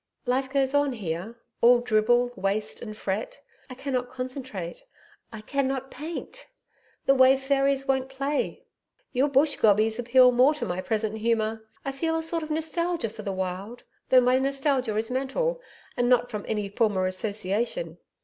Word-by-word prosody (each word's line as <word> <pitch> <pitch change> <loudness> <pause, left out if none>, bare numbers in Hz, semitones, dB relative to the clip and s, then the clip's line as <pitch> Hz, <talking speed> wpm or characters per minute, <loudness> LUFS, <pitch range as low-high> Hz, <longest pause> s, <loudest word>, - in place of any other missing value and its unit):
Life 260 +2 0
goes 270 -1 +1
on 285 -2 +2
here, 190 +1 -5 0.3
all 245 +1 +7
dribble, 240 +1 +2
waste 210 +1 -2
and 215 -2 -7
fret 205 +6 -3 0.3
I 255 - -8
cannot 255 -2 -3
concentrate, 255 - -6 0.5
I 220 -2 -8
cannot 270 +2 -2
paint 335 - -7 0.6
the 275 - +5
Wave 265 0 +5
fairies 275 0 +1
won't 265 -1 0
play 275 +2 -2 0.5
Your 260 +3 +2
Bush 280 +2 +3
gobies 220 +2 +3
appeal 250 +1 +5
more 255 +5 +4
to 300 - -3
my 180 +1 -3
present 220 +1 -2
humour. 220 -1 -1 0.2
I 275 - -1
feel 325 +4 -1
a 325 - -2
sort 330 +1 0
of 310 - -6
nostalgia 320 -2 -1
for 220 0 -9
the 200 -2 -3
wild 190 +5 -5 0.3
though 255 -1 +7
my 250 +1 +3
nostalgia 270 -4 0
is 225 +2 -1
mental, - - -1 0.3
and 245 -1 +1
not 245 -1 +3
from 210 -2 -5
any 210 -2 -1
former 200 -2 +1
association. 210 - -2
250 Hz, 160 wpm, -26 LUFS, 215-275 Hz, 0.6 s, all